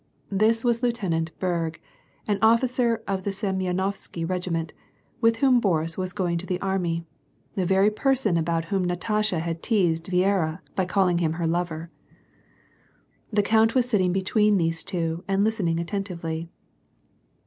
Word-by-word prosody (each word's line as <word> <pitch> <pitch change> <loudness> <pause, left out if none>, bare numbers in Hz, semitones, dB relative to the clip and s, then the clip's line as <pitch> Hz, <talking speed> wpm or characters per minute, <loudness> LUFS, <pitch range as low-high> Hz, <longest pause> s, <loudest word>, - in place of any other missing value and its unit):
This 220 +4 +2
was 235 -1 +2
Lieutenant 185 -10 -1
Berg, 170 -3 -2 0.5
an 205 -2 0
officer 230 0 +3
of 195 -1 -1
the 200 - -3
Seniyenovsky 190 -3 -2
regiment, 170 -3 -2 0.5
with 230 0 +4
whom 255 +1 +4
Boris 165 -6 0
was 185 -1 -3
going 175 -4 -1
to 185 - -6
the 180 -1 -1
army; 175 -4 -1 0.5
the 185 -3 -1
very 195 +3 +4
person 245 -4 +1
about 165 0 0
whom 190 -1 +2
Natasha 190 +2 0
had 165 0 -3
teased 175 -7 +1
Viera 185 -2 +1
by 190 - +1
calling 180 -2 +2
him 160 -2 +1
her 170 0 -2
lover. 165 -1 -2 1.4
The 205 -1 +2
count 220 +3 +3
was 250 -1 +3
sitting 190 -7 +2
between 205 +2 +2
these 165 -2 +1
two 165 -1 -2
and 195 +1 +2
listening 195 -7 0
attentively. 170 -3 -4
185 Hz, 145 wpm, -25 LUFS, 170-210 Hz, 1.4 s, with